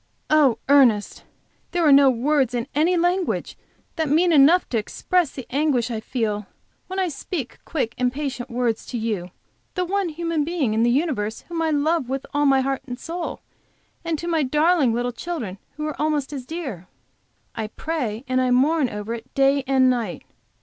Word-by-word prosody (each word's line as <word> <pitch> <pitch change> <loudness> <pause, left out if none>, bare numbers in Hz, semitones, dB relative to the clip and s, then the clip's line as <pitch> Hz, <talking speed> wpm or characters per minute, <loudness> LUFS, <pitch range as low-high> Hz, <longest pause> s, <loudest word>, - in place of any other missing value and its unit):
"Oh, 285 -7 +5
Ernest! 255 -7 +3 0.5
there 350 -2 +2
are 300 - +6
no 275 0 +7
words 260 0 +1
in 235 -1 -1
any 330 +5 +2
language 355 +1 0 0.4
that 320 -3 0
mean 340 +4 +3
enough 310 +5 +6
to 230 - +1
express 350 +9 0
the 260 -3 -8
anguish 265 -4 +1
I 225 - -2
feel 215 -3 -2 0.4
when 375 - -6
I 380 -1 +1
speak 300 -3 -5
quick, 250 -8 -2
impatient 255 0 -2
words 235 -2 -1
to 245 - -4
you, 215 -6 -2 0.5
the 365 - 0
one 390 0 0
human 330 -1 -1
being 300 -8 -1
in 220 - +1
the 235 - +4
universe 240 -6 0
whom 335 -1 -2
I 325 - +1
love 305 -2 +1
with 270 0 -3
all 290 0 +2
my 270 -1 +4
heart 270 0 -1
and 245 -1 -5
soul, 340 +1 -5 0.6
and 335 -2 -1
to 340 - -6
my 330 -2 +1
darling 300 0 +3
little 240 +2 -1
children 240 - -5 0.2
who 305 0 -4
are 305 -1 -4
almost 300 -2 0
as 260 -3 -6
dear! 265 - -6 0.7
I 220 - -3
pray 245 -3 -3
and 255 0 +1
mourn 285 +1 +3
over 210 +2 -5
it 235 +2 -8
day 275 0 +3
and 265 -1 +4
night. 235 -7 -1
275 Hz, 180 wpm, -23 LUFS, 240-320 Hz, 0.7 s, no